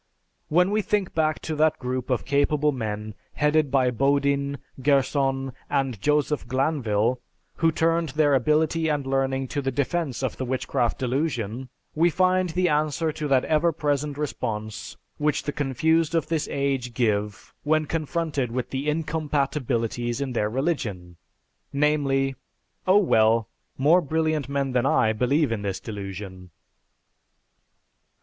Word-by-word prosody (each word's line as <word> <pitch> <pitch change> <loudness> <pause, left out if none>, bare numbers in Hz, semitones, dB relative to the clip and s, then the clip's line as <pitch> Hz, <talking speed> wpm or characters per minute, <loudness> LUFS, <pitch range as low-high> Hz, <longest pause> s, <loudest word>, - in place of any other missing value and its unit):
When 180 +5 +3
we 215 +1 +2
think 205 -2 -1
back 155 -1 +1
to 160 - -3
that 155 0 +3
group 125 0 -3
of 125 - 0
capable 145 +1 +2
men 110 -4 -4 0.2
headed 150 0 +2
by 130 -2 +2
Bodin, 140 +2 +1 0.2
Gerson, 135 -1 +1 0.2
and 130 -7 -1
Joseph 150 0 +1
Glanvil, 125 -4 0 0.4
who 165 -1 +3
turned 165 0 +1
their 145 +1 +2
ability 155 +4 +2
and 145 -3 0
learning 135 0 0
to 145 - -2
the 135 - -1
defense 140 0 -2
of 130 - -2
the - - -3
Witchcraft 130 -1 -1
Delusion, 130 -3 -2 0.2
we 165 +3 +3
find 185 +1 +2
the 180 +2 +1
answer 155 +1 +1
to 150 -1 -4
that 135 -2 +3
ever 160 +2 +2
present 145 -2 -1
response 110 -7 -4 0.2
which 150 0 +1
the 145 - -2
confused 160 +4 +1
of 165 - +1
this 160 -2 -1
age 135 -4 -2
give 105 -4 -1
when 155 +1 +1
confronted 155 -4 -2
with 125 +1 -3
the 135 +2 -3
incompatabilities 140 -6 -1
in 135 -2 -3
their 105 -3 0
religion, 110 - -3 0.5
namely, 140 -2 +1 0.5
"Oh, 190 +2 +6
well, 115 - +3 0.3
more 155 +7 +5
brilliant 155 -2 -1
men 140 -1 -1
than 125 +1 +1
I 110 -4 +3
believe 135 +5 +1
in 110 -2 -2
this 100 -2 -3
delusion." 95 -3 -7
140 Hz, 140 wpm, -25 LUFS, 125-155 Hz, 0.5 s, Oh